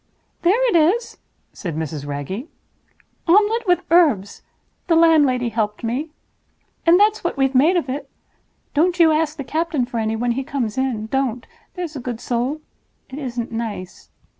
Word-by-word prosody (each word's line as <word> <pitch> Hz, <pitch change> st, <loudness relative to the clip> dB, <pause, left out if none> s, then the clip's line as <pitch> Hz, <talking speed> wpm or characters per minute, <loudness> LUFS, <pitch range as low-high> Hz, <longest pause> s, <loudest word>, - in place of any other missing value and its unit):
"There 440 Hz, +9 st, +3 dB
it 455 Hz, -, +1 dB
is!" 360 Hz, +9 st, +2 dB, 0.3 s
said 170 Hz, -5 st, -5 dB
Mrs. 155 Hz, -2 st, -4 dB
Wragge. 145 Hz, -, -5 dB, 0.8 s
"Omelette 420 Hz, +5 st, +3 dB
with 355 Hz, 0 st, +3 dB
herbs. 275 Hz, -, +3 dB, 0.5 s
The 335 Hz, -, +3 dB
landlady 290 Hz, -7 st, +4 dB
helped 215 Hz, -1 st, -2 dB
me. 255 Hz, +8 st, -2 dB, 0.8 s
And 345 Hz, +2 st, +7 dB
that's 425 Hz, +1 st, +3 dB
what 345 Hz, -, -2 dB
we've 270 Hz, 0 st, +2 dB
made 300 Hz, +8 st, +4 dB
of 330 Hz, -, -1 dB
it. 275 Hz, +1 st, -5 dB, 0.6 s
Don't 345 Hz, +4 st, +2 dB
you 325 Hz, -2 st, +6 dB
ask 310 Hz, 0 st, 0 dB
the 280 Hz, -, -4 dB
captain 315 Hz, -2 st, -1 dB
for 240 Hz, -1 st, -4 dB
any 220 Hz, 0 st, -1 dB
when 240 Hz, +2 st, 0 dB
he 265 Hz, +3 st, -2 dB
comes 245 Hz, -5 st, -3 dB
in—don't, 255 Hz, -1 st, -1 dB, 0.3 s
there's 350 Hz, -4 st, -5 dB
a -, -, -4 dB
good 240 Hz, -2 st, -5 dB
soul. 250 Hz, +6 st, -2 dB, 0.5 s
It 270 Hz, -, -6 dB
isn't 240 Hz, -4 st, -4 dB
nice. 220 Hz, -5 st, -6 dB
270 Hz, 160 wpm, -21 LUFS, 235-335 Hz, 0.8 s, And